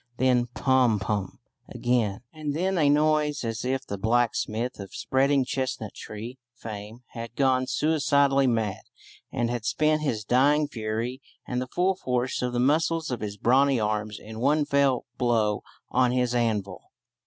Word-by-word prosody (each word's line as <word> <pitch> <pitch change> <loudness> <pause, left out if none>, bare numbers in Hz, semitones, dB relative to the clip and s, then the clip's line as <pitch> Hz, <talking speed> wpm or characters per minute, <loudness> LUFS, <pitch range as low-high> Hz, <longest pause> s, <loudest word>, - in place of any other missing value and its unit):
Then 125 -1 +2
Pom 130 -5 +3
poom 100 -1 -3 0.3
again, 120 -4 0
and 150 -2 -4
then 190 +4 0
a 145 -2 +4
noise 150 -2 +2
as 115 0 -3
if 130 +1 -1
the 100 -5 -5
blacksmith 115 +1 0
of 100 -1 -8
"spreading 135 0 +2
chestnut 130 -5 -3
tree" 115 +5 -8 0.2
fame 110 +2 -8
had 115 0 -8
gone 130 -2 +2
suicidally 140 -3 +2
mad 110 -4 0 0.5
and 120 -1 -1
had 120 -2 -3
spent 155 +6 +1
his 115 -8 -1
dying 145 +6 +3
fury 115 +1 -4 0.2
and 125 0 -2
the 130 - -4
full 185 +7 +1
force 125 -6 -1
"of 125 0 -1
the 120 - -1
muscles 160 +3 +1
of 125 - -3
his 105 -1 -4
brawny 130 +4 +3
arms" 105 -1 -2
in 110 +1 -9
one 145 +4 +2
fell 140 -3 +2
blow 110 -4 +1 0.3
on 125 0 +3
his 125 -1 +1
anvil. 110 -5 -1
125 Hz, 155 wpm, -26 LUFS, 110-140 Hz, 0.5 s, a